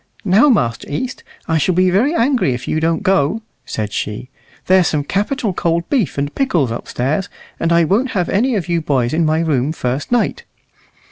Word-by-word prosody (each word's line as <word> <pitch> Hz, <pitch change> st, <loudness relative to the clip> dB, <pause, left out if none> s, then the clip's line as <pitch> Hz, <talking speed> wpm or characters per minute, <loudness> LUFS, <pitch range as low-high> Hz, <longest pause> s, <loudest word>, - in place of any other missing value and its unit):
"Now, 210 Hz, +10 st, +5 dB
Master 120 Hz, -, +1 dB
East, 250 Hz, -, -4 dB, 0.2 s
I 160 Hz, -1 st, +1 dB
shall 175 Hz, +4 st, +1 dB
be 185 Hz, 0 st, +3 dB
very 250 Hz, -, +2 dB
angry 240 Hz, -, +2 dB
if 125 Hz, -, -8 dB
you 155 Hz, -, 0 dB
don't 165 Hz, 0 st, 0 dB
go," 195 Hz, +3 st, +1 dB, 0.2 s
said 105 Hz, -1 st, -4 dB
she; 105 Hz, +5 st, -4 dB, 0.3 s
"there's 185 Hz, -1 st, +4 dB
some 150 Hz, -2 st, 0 dB
capital 210 Hz, -, -1 dB
cold 170 Hz, 0 st, -1 dB
beef 240 Hz, -, 0 dB
and 145 Hz, +1 st, -2 dB
pickles 175 Hz, -, +1 dB
upstairs, 135 Hz, +8 st, -2 dB, 0.3 s
and 165 Hz, -, 0 dB
I 170 Hz, 0 st, +4 dB
won't 210 Hz, +11 st, +1 dB
have 180 Hz, -, +1 dB
you 195 Hz, -6 st, 0 dB
old 160 Hz, -, -4 dB
boys 130 Hz, -3 st, +1 dB
in 160 Hz, 0 st, +2 dB
my 155 Hz, +1 st, +1 dB
room 145 Hz, -3 st, 0 dB
first 135 Hz, -, -3 dB
night." 245 Hz, -1 st, 0 dB
170 Hz, 185 wpm, -18 LUFS, 145-205 Hz, 0.3 s, Now